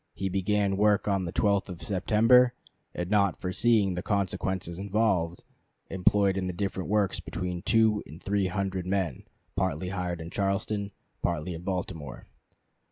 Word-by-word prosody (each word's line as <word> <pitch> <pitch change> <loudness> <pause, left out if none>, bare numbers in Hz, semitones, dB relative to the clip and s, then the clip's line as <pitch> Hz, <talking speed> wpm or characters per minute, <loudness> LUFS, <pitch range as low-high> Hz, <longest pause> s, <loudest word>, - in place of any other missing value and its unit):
He 95 - -2
began 100 +1 +1
work 105 0 +3
on 100 -2 +1
the 85 - -4
12th 100 +1 +1
of 90 -2 -8
September; 115 +6 +4 0.4
and 90 - -2
not 100 -3 +2
foreseeing 100 +1 +2
the 90 - -3
consequences 95 -3 -2
involved, 95 -4 0 0.5
employed 95 +1 +3
in 95 -1 -1
the 90 - -3
different 95 0 -3
works 105 -2 +1
between 90 -1 -4
two 110 0 +3
and 80 +4 -11
three 100 0 0
hundred 95 -1 -2
men, 95 -8 -1 0.3
partly 95 -1 -1
hired 90 -3 -3
in 80 +1 -7
Charleston, 100 +1 -1 0.3
partly 85 0 -1
in 80 - -7
Baltimore. 90 -7 -4
95 Hz, 150 wpm, -28 LUFS, 90-100 Hz, 0.5 s, September